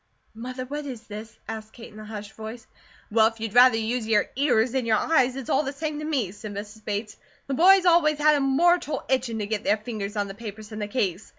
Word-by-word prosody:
"Mother, 255 +3 -6
what 290 +2 -5
is 245 -4 -7
this?" 215 +1 -8 0.2
asked 220 -1 -7
Kate 230 -2 -12
in 215 - -11
a 215 - -9
hushed 210 -1 -7
voice. 220 +1 -8 0.5
"Well, 220 0 +5
if 225 0 -6
you'd 220 -2 -4
rather 245 -1 +7
use 225 +1 -2
your 210 -2 +2
ears 255 -4 +2
than 260 -2 -1
your 220 -1 +4
eyes, 260 -4 +2
it's 270 -3 -6
all 270 - +3
the 275 -2 -3
same 300 +1 -4
to 305 - -5
me," 265 - -1
said 205 0 -8
Mrs. 210 +1 -8
Bates. 210 +1 -4 0.3
"The 275 - -3
boys 370 +6 +6
always 335 -4 +4
had 300 +1 +5
a 290 - +2
mortal 305 +4 +2
itchin' 250 -3 0
to 210 - -2
get 215 0 -3
their 210 - +2
fingers 210 -2 -5
on 205 -1 0
the 195 - -7
papers 215 0 -9
in 215 - -6
the 210 - -3
case. 205 -4 -2
225 Hz, 240 wpm, -25 LUFS, 215-270 Hz, 0.5 s, rather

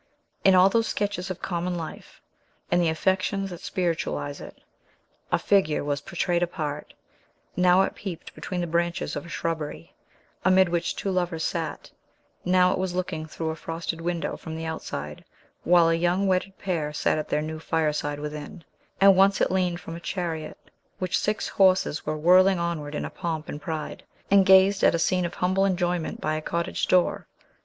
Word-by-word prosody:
In 190 -1 +6
all 185 +1 +7
those 225 +3 +2
sketches 200 -2 -2
of 185 - -6
common 175 0 -2
life, 160 -2 -8 0.5
and 175 - +4
the 170 - +2
affections 190 +4 0
that 175 - -8
spiritualize 165 -5 -2
it, - - -11 0.7
a - - +4
figure 190 -8 +2
was 145 0 -2
portrayed 175 -1 -1
apart, 150 -4 -4 0.6
now 180 +1 +5
it - - -2
peeped 185 -5 -7
between 180 -2 -4
the - - -1
branches 170 +1 -1
of - - -5
a - - -11
shrubbery, 155 - -4 0.5
amid 185 0 +5
which 170 -1 -1
two 195 - -2
lovers 175 -3 -1
sat; - - -3 0.5
now 180 0 +4
it - - -1
was 185 -1 -2
looking 175 -4 -3
through 160 0 -3
a - - -5
frosted 165 +1 -5
window, 170 0 -2
from 160 -1 -8
the 160 0 -5
outside, 75 - -5 0.4
while 175 -1 +5
a - - +3
young 175 +4 +1
wedded 190 0 0
pair 165 -6 -2
sat 150 +1 0
at 155 - -5
their 150 - 0
new 155 0 -5
fireside 150 -3 -1
within; 150 +2 -7 0.4
and 195 0 +7
once 195 +1 +4
it - - +2
leaned 180 -2 0
from 165 -1 -8
a - - -7
chariot, 165 -3 -4 0.4
which 185 -2 -1
six 210 +1 0
horses 185 -6 +2
were 155 0 -1
whirling 185 +4 +5
onward 165 -4 -3
in - - -2
pomp 165 -3 -4
and 145 - -6
pride, 160 -2 -5 0.3
and 200 -1 +6
gazed 190 +1 +6
at - - +5
a - - +2
scene 180 +2 +1
of - - -10
humble 185 +2 +1
enjoyment 180 -3 0
by 155 - -1
a 155 - -2
cottage 170 +2 -2
door. 180 -1 +2
175 Hz, 180 wpm, -26 LUFS, 160-185 Hz, 0.7 s, all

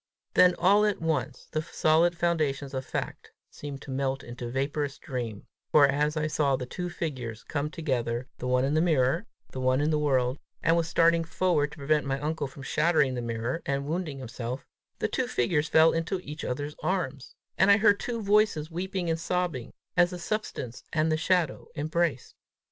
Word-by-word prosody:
Then 180 -1 +6
all 200 +4 +4
at 210 -2 +1
once 155 -5 -2
the 155 - 0
solid 165 +2 +2
foundations 150 -5 0
of 130 0 -2
fact - - -5 0.2
seemed 140 -2 -7
to 140 - -8
melt 135 0 -1
into 120 0 -7
vaporous 140 +2 -2
dream, 120 -6 -5 0.3
for 145 -2 +7
as 150 +2 0
I 155 - 0
saw 150 -3 +1
the 130 - -4
two 180 +7 -4
figures 130 -10 -5
come 150 0 -2
together, 125 -6 -2
the 125 - -3
one 125 +1 +2
in 140 - 0
the 155 - +3
mirror, 160 - +2 0.2
the 130 - -5
other 130 +2 +2
in 155 - +2
the 155 - +2
world, 130 -2 +1 0.2
and 165 - +4
was 165 -1 +1
starting 170 0 +4
forward 165 -3 +1
to - - -12
prevent 150 0 +1
my 135 0 -1
uncle 150 0 -2
from 135 +1 -11
shattering 150 -2 +2
the 125 - -3
mirror 115 +6 -3
and 140 0 -1
wounding 160 -2 -3
himself, 125 0 -5 0.3
the - - 0
figures 150 +5 0
fell 160 +1 +6
into 165 +3 -1
each 150 +1 -7
other's 145 +4 -3
arms, 155 -6 -2 0.2
and 190 - +4
I 200 - +8
heard 205 -1 +4
two 230 -2 -3
voices 200 -6 +2
weeping 185 +1 -3
and 165 0 0
sobbing, 170 -8 -2 0.2
as 175 -1 +5
the 180 - -6
substance 175 - -4
and 155 0 +1
the - - +3
shadow 165 -2 0
embraced. 155 -2 -1
150 Hz, 190 wpm, -28 LUFS, 135-170 Hz, 0.3 s, I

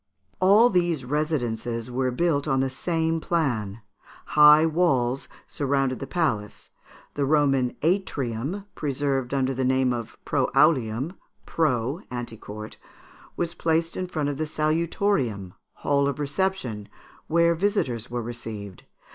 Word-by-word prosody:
All 205 +6 +6
these 175 -7 +1
residences 120 -5 -2
were 130 +1 0
built 145 +2 0
on 135 -2 +2
the 135 0 0
same 165 +2 -1
plan. 120 - -1 0.5
High 150 +1 +8
walls 135 -7 +1 0.2
surrounded 135 -2 -1
the 135 - -6
palace. 120 - -2 0.4
The 145 - -1
Roman 135 -3 +2
atrium, 160 - -1
preserved 135 -3 -1
under 135 -1 0
the 130 +1 -2
name 130 -1 +2
of 115 -2 -6
proaulium 135 0 +2 0.3
(preau, 140 0 0
ante 120 -2 -5
court), 105 +1 -9 0.6
was 170 -1 -1
placed 165 0 0
in 185 - -3
front 150 -5 -2
of 140 - -3
the 155 - -1
salutorium 155 - 0 0.2
(hall 140 -1 +1
of 140 - -2
reception), 145 - -2 0.4
where 170 +1 +3
visitors 160 - -1
were 120 0 -3
received. 110 -5 -7
140 Hz, 125 wpm, -25 LUFS, 120-165 Hz, 0.6 s, High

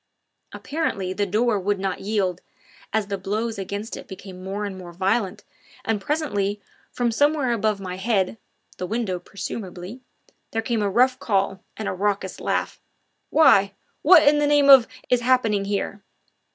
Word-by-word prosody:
Apparently 200 - -3
the 205 +1 -1
door 215 +2 +1
would 200 +2 0
not 190 -1 -2
yield, 195 -4 -1 0.5
as 220 -1 +1
the 200 -1 -4
blows 215 +3 -2
against 200 +3 -5
it - - -10
became 190 -1 -10
more 200 +2 -3
and 200 -2 -5
more 180 -2 -9
violent, 190 +3 -1 0.4
and 220 -2 0
presently 205 -8 -1 0.3
from 240 -1 0
somewhere 285 0 +2
above 215 -2 0
my 185 -1 -6
head 200 0 0 0.4
the 180 - -3
window 215 -4 -2
presumably 195 +3 -7 0.5
there 225 0 -1
came 225 -1 -1
a 205 - +1
rough 255 +5 +3
call, 195 -2 0
and 215 - -4
a - - -1
raucous 195 0 -2
laugh: - - -2 0.5
"Why? 200 -11 +5 0.3
what 320 -1 +7
in 295 0 +5
the 295 - +2
name 290 -1 +6
of 260 -4 +9 0.2
is 250 -1 +4
happening 230 -5 +2
here?" 200 0 -3
205 Hz, 160 wpm, -23 LUFS, 195-240 Hz, 0.5 s, of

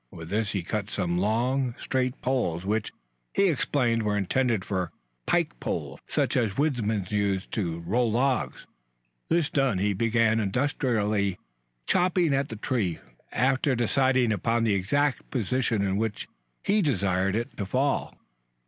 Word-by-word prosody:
With 80 +4 -9
this 105 +1 -1
he 95 -4 -1
cut 105 +3 -3
some 90 -3 -1
long, 120 +5 +1
straight 130 -1 -1
poles 95 -10 0
which, 105 +1 -1 0.4
he 200 - +4
explained, 125 -6 +1
were 105 -1 0
intended 110 +1 +1
for 95 -4 -2 0.4
pike - - +1
poles - - -4
such - - 0
as 110 -5 +1
woodsmen 115 -9 0
use 100 -2 0
to 85 -6 -2
roll 115 +7 +1
logs. 125 +1 0 0.6
This 165 -2 +2
done, 135 -8 +2
he 100 +2 +1
began 115 +2 +2
industriously 105 -4 0 0.5
chopping 175 -3 +2
at 140 +1 0
the 110 - -5
tree 105 -6 -1 0.3
after 130 +2 +2
deciding 125 0 +2
upon 115 +3 +1
the 110 -3 +2
exact 135 +9 0
position 120 -2 0
in 95 0 0
which 110 -1 -2 0.4
he 205 +2 +3
desired 95 - +1
it 115 +1 -3
to 100 - -3
fall. 135 +6 0
115 Hz, 145 wpm, -27 LUFS, 100-130 Hz, 0.6 s, he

